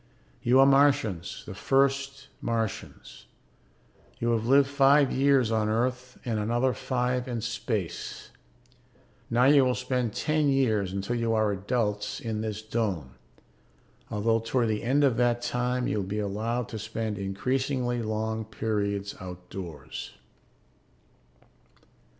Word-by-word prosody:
You 125 +2 +4
are 135 - +8
Martians, 135 - +2
the - - -7
first 140 +4 0
Martians. 115 -3 -4 0.9
You 120 0 0
have 115 0 0
lived 135 +1 +5
five 140 0 +4
years 135 -4 +3
on 110 -1 +1
Earth 125 +3 -1
and 115 -3 -1
another 120 +4 +1
five 125 +1 -1
in 120 -2 -3
space. 115 -6 -4 1.0
Now 120 +1 +3
you 140 +1 +6
will 125 -1 +2
spend 125 -4 -1
ten 155 -1 +1
years, 110 -8 +2
until 100 +5 -2
you 115 -1 0
are 110 -1 +2
adults, 105 +1 -1
in 110 -2 -3
this 110 -1 -4
dome, 100 - -2 1.0
although 115 +2 +1
toward 115 +1 0
the 105 -1 -1
end 135 +5 +2
of 130 -5 +3
that 120 0 +2
time 125 0 -1
you - - -1
will 100 - 0
be 105 +2 -3
allowed 110 +3 -2
to 110 - -5
spend 110 -1 -4
increasingly 125 +5 -1
long 110 0 -2
periods 105 -2 -2
outdoors. 90 -4 -8
115 Hz, 130 wpm, -27 LUFS, 105-130 Hz, 1.0 s, are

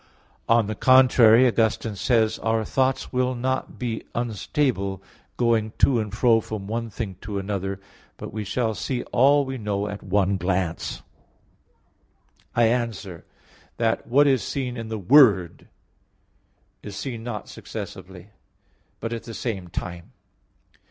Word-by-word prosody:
On 115 -1 +4
the 110 - -3
contrary, 125 -1 +6
Augustine 110 -2 0
says 110 +1 +1
(De - - -15
Trin. - - -9
xvi): - - 0
"Our 110 -1 0
thoughts 130 +2 0
will 130 0 +1
not 130 +2 -2
be 120 -3 -3
unstable, 115 -3 -1 0.4
going 115 -2 +1
to 125 -4 +4
and 105 -2 -3
fro 115 0 +3
from 105 -2 -6
one 115 +2 -3
thing 100 -4 -6
to 100 0 -5
another; 95 0 -3 0.4
but - - -8
we 110 0 -3
shall 110 +2 -1
see 125 +3 -3
all 140 +3 +4
we 130 -1 -5
know 105 -1 -2
at 105 - -6
one 100 0 +1
glance." 90 -1 -2 1.5
I 120 - +4
answer 115 -7 -1 0.5
that, 115 -1 0
What 140 +5 +4
is 135 -4 +3
seen 130 -3 -3
in 115 -2 -6
the 110 0 -4
Word 100 - +4 1.1
is 105 -2 -8
seen 115 +1 -5
not 115 -3 -5
successively, 95 -2 -9 0.7
but 115 +1 -4
at 115 - -6
the 115 -1 -8
same 100 -7 -4
time. 85 0 -7
110 Hz, 145 wpm, -24 LUFS, 100-125 Hz, 1.5 s, contrary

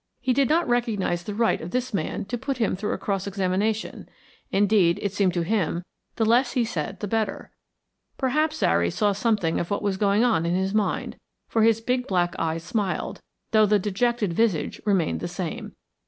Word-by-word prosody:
He 255 - +1
did 275 +1 +2
not 335 +3 +2
recognise 225 -8 0
the 205 +3 -6
right 230 +1 +1
of 165 - -6
this 250 +3 -2
man 195 0 -2
to 245 - -3
put 265 +2 -3
him 225 -6 +1
through 210 +3 -2
a - - -2
cross 195 -1 -2
examination. 200 +3 -1 0.4
Indeed, 200 -3 +3
it 200 -2 -2
seemed 195 -3 +1
to 175 - +1
him, 180 -3 0 0.3
the 225 - +1
less 245 +3 +3
he 245 -2 +2
said 165 -9 -4
the 205 - -2
better. 215 -1 -2 0.7
Perhaps 305 +4 +1
Zary 85 - +2
saw 205 - +1
something 200 -5 0
of 170 - -3
what 200 - -2
was 200 -2 0
going 205 +2 +3
on 225 -9 +2
in 170 +1 0
his 190 +1 0
mind, 210 -1 -1 0.3
for 225 - +1
his 225 0 +4
big 250 +2 -1
black 175 -2 +1
eyes 165 0 -1
smiled, 195 +2 -2 0.3
though 215 -1 +5
the 210 +1 +4
dejected 210 0 0
visage 205 -5 0
remained 190 -6 +1
the - - -3
same. 175 -2 -5
205 Hz, 195 wpm, -25 LUFS, 185-230 Hz, 0.7 s, though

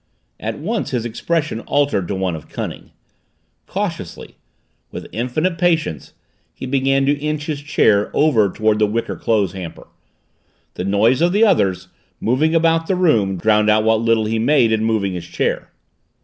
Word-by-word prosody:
At 110 0 -4
once 205 +3 -3
his 125 -4 -2
expression 150 +3 -2
altered 140 -8 0
to 100 - -3
one 95 -3 -1
of 80 - -11
cunning - - -6 0.8
cautiously, - - -5 0.5
with - - -8
infinite 155 +9 -2
patience, 165 - 0 0.4
he - - -7
began 135 +1 +1
to 140 - +3
inch 150 0 -3
his 150 -2 -4
chair 105 -8 +2
over 115 -10 +3
toward 110 +1 +1
the 105 - +3
wicker 115 +3 -2
clothes 105 -5 0
hamper. 90 -4 -8 0.9
The 90 - -5
noise 110 +7 +2
of 175 +1 +3
the 215 +3 +5
others, 95 - +1 0.3
moving 150 +8 +1
about 165 0 +2
the 190 - +1
room, 110 - +2
drowned 105 +3 +2
out 110 0 +3
what 110 0 +2
little 115 -1 +2
he 110 +1 -1
made 120 -1 +3
in 110 0 +1
moving 110 -4 0
his 85 -2 -6
chair. - - -2
115 Hz, 165 wpm, -19 LUFS, 105-150 Hz, 0.9 s, the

